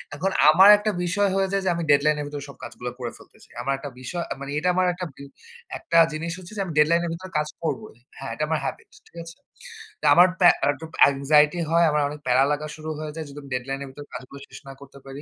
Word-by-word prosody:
এখন 190 +6 -1 0.2
আমার 190 +6 +7
একটা 210 +1 -1
বিষয় 200 +3 +1
হয়ে 195 0 +1
যায় 195 - 0
যে, - - +2
আমি 170 - -3
deadline 150 +1 +3
এর 145 - -4
ভেতরে 145 -1 -7
সব 140 - -13
কাজগুলা 125 0 -7
করে 120 -2 -4
ফেলতে - - -20
চাই। - - -21
আমার 135 +3 -1
একটা 140 +1 -8
বিষয়, 170 +6 -4
আ - - +1
মানে 140 +1 -6
এটা 180 - -2
আমার 185 0 +2
একটা 180 0 -6
বি 140 - -12 0.5
একটা 170 - -1 0.2
জিনিস 165 +2 -4
হচ্ছে 185 +3 -12
যে - - -1
আমি 170 - -6
deadline 170 +3 +4
এর - - -3
ভেতরে 185 +2 -9
কাজ 150 0 0 0.2
করবই। 215 - -4 0.2
হ্যাঁ, 135 - -7
এটা 155 - -3
আমার 160 -1 0
habit - - -6 0.2
ঠিক - - -25
আছে? 165 0 -12 0.8
আমার 175 +2 +7
প্যা 175 -2 +7
আর 140 - +3
একটু 155 +4 -10 0.3
anxiety 150 +4 +3
হয়, 170 +1 +4
আমার 150 0 +1
অনেক 150 0 -8
প্যারা 125 +2 +4
লাগা 150 +1 -2
শুরু 155 0 -8
হয়ে 155 -1 -5
যায় 160 - -5
যদি 140 - -10
আমি 140 - -13
ডেডলাইন 135 +2 -4
এর - - -8
ভেতরে 145 +2 -12
কাজগুলো 135 +2 -10
শেষ - - -12
না 135 - -8
করতে 140 0 -14
পারি। 135 +2 -9
155 Hz, 250 wpm, -24 LUFS, 140-175 Hz, 0.8 s, আমার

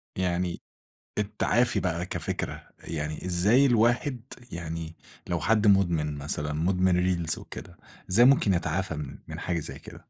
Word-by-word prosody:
يعني 90 -1 -1 0.6
التعافي 105 +3 +1
بقى 90 -1 -1
كفكرة، - - -4
يعني 75 +1 -4
إزاي 100 +10 +4
الواحد 120 +2 +2 0.3
يعني 80 -1 -5 0.3
لو 85 -1 -1
حد 110 +5 +3
مُدمن 85 -7 +3
مثلًا 75 +1 -3
مُدمن 90 +3 +2
ريلز 90 -3 0
وكده 85 -1 -10 0.3
إزاي 115 +7 +6
ممكن 130 -7 +5
يتعافى 85 0 -1
من 70 -2 -6
من - - -6
حاجة 85 -2 -1
زي - - -7
كده؟ - - -11
90 Hz, 135 wpm, -27 LUFS, 80-105 Hz, 0.6 s, إزاي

